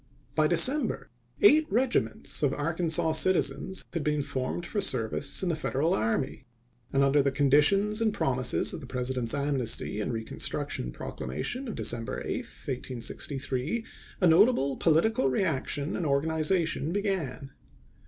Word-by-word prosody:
By 155 0 +3
December, 255 - +3 0.3
eight 315 -7 +6
regi 245 +4 +2
ments 110 0 -3
of 140 -2 +1
Arkansas 160 +1 0
citizens 185 +3 +1
had 165 -3 -2
been 150 -1 0
formed 130 +6 -4
for 205 +3 -2
service 140 - +1
in 185 - 0
the 165 - 0
Federal 155 +1 -1
army; 115 +6 -2 0.4
and 140 0 +2
under 140 +1 +4
the 140 - +1
con 140 0 0
ditions 200 +9 +3
and 220 -1 +2
promises 130 -9 0
of - - -6
the 135 - -10
President's 125 -2 -2
amnesty 135 -7 0
and 105 - -2
reconstruction 110 - -4
proclamation 75 - -5
of 225 - -5
December 115 -1 0
8, - - -2
1863, 130 - -4 0.4
a - - +4
notable 165 - +4
political 165 -1 +2
reaction 145 0 -1
and 170 - -2
organization 160 +3 0
began. 175 -9 -3
150 Hz, 140 wpm, -28 LUFS, 130-185 Hz, 0.4 s, eight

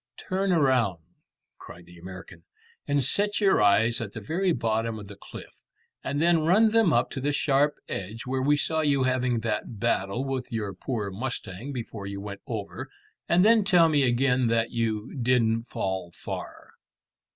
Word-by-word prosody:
"Turn 195 0 -2
round," 130 - +2 0.6
cried 85 0 -12
the 85 0 -15
American, 90 -1 -11 0.4
"and 145 -1 +1
set 205 - +1
your 195 - +3
eyes 105 +3 +3
at 105 -3 -5
the - - -5
very 175 - 0
bottom 115 -4 -1
of 105 - -8
the 100 - -10
cliff, 100 - -12 0.4
and 140 +2 -2
then 165 0 +3
run 210 +7 +4
them 225 -6 +4
up 120 -3 +2
to 135 - -4
the 145 +2 0
sharp 145 +1 +2
edge 105 +4 -5
where 130 0 -1
we 145 +2 +3
saw 160 +2 0
you 140 -3 +2
having 125 -2 +1
that 110 -1 -3
battle 100 +7 0
with 135 -2 -4
your 105 -4 -3
poor 105 -6 -4
mustang 115 +1 -5
before 115 -6 -6
you 100 0 -5
went 100 0 -7
over, 105 -4 -5 0.4
and 180 +3 +4
then 225 -1 +5
tell 175 -4 +5
me 150 -2 +3
again 125 0 +2
that 115 0 +1
you 110 -2 -2
didn't 115 -2 +2
fall 95 -2 -3
far." - - -8
120 Hz, 175 wpm, -26 LUFS, 105-145 Hz, 0.6 s, then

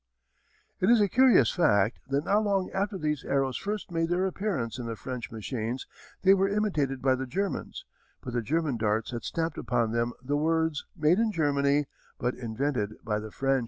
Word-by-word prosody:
] - - -39
It 185 - +3
is 240 -1 +6
a 205 - +4
curious 255 +4 +5
fact 110 - +2
that 140 +2 0
not 210 +2 +3
long 195 -3 0
after 200 +1 -1
these 150 -4 -2
arrows 135 -2 0
first 205 -2 -4
made 165 -1 0
their 180 +2 +1
appearance 175 - -2
in 120 - -4
the 115 - -3
French 125 +2 -6
machines, 115 +2 -4 0.4
they 190 0 +7
were 195 0 +2
imitated 155 -11 0
by 130 -1 +4
the 130 0 -3
Germans, 195 +8 -3 0.4
but 125 - -6
the 120 - 0
German 150 +2 0
darts 110 +1 0
had 120 -2 -5
stamped 165 -1 -2
upon 120 -2 0
them 120 +1 0
the 140 +3 -1
words: 160 0 0
"Made 160 +5 +3
in 225 -1 +2
Germany, 145 -3 +2 0.3
but 125 +1 -1
invented 120 -2 -2
by 105 -1 -1
the 110 0 -7
French." 135 +4 +1
145 Hz, 195 wpm, -28 LUFS, 120-185 Hz, 0.4 s, they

